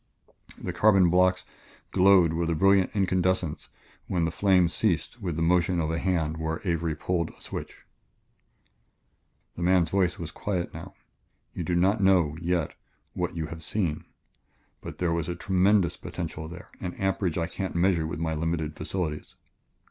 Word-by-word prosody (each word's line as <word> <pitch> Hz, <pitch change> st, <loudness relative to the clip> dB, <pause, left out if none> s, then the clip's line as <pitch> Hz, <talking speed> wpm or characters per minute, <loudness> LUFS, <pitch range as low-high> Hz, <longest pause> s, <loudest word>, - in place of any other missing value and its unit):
The 90 Hz, -, -5 dB
carbon 95 Hz, -2 st, +4 dB
blocks 90 Hz, +1 st, +3 dB, 0.5 s
glowed 95 Hz, -3 st, +5 dB
with 85 Hz, 0 st, -1 dB
a 85 Hz, -, +1 dB
brilliant 95 Hz, +2 st, +4 dB
incandescence 95 Hz, -4 st, 0 dB, 0.4 s
when 85 Hz, -3 st, 0 dB
the 80 Hz, -, -1 dB
flame 95 Hz, -1 st, +3 dB
ceased 105 Hz, +5 st, -1 dB
with 90 Hz, -5 st, -3 dB
the 80 Hz, -, -1 dB
motion 90 Hz, +1 st, +2 dB
of 80 Hz, -1 st, -1 dB
a 80 Hz, -, -1 dB
hand 80 Hz, -4 st, 0 dB
where 80 Hz, 0 st, -3 dB
Avery 85 Hz, -2 st, 0 dB
pulled 85 Hz, +1 st, -1 dB
a -, -, -17 dB
switch. -, -, -8 dB, 1.7 s
The -, -, -7 dB
man's 90 Hz, -2 st, +3 dB
voice 95 Hz, -3 st, +1 dB
was 85 Hz, -2 st, -6 dB
quiet 90 Hz, -4 st, -3 dB
now. -, -, -9 dB, 0.6 s
"You 90 Hz, -, -4 dB
do 85 Hz, +2 st, -1 dB
not 95 Hz, +4 st, +2 dB
know, 90 Hz, -6 st, +3 dB
yet, 85 Hz, -2 st, -1 dB, 0.4 s
what -, -, -3 dB
you 80 Hz, -2 st, -2 dB
have 80 Hz, -, -9 dB
seen, 85 Hz, -4 st, -2 dB, 0.8 s
but -, -, -8 dB
there 85 Hz, -2 st, 0 dB
was 85 Hz, 0 st, -2 dB
a 90 Hz, -, -2 dB
tremendous 95 Hz, 0 st, +2 dB
potential 80 Hz, 0 st, -6 dB
there 85 Hz, +2 st, -10 dB
an 90 Hz, -1 st, -5 dB
amperage 95 Hz, -3 st, -1 dB
I 85 Hz, -, 0 dB
can't 95 Hz, +1 st, -5 dB
measure 85 Hz, -2 st, +2 dB
with 75 Hz, -, -5 dB
my 80 Hz, 0 st, -2 dB
limited 80 Hz, -1 st, -2 dB
facilities." 80 Hz, -2 st, -3 dB
85 Hz, 165 wpm, -27 LUFS, 80-95 Hz, 1.7 s, glowed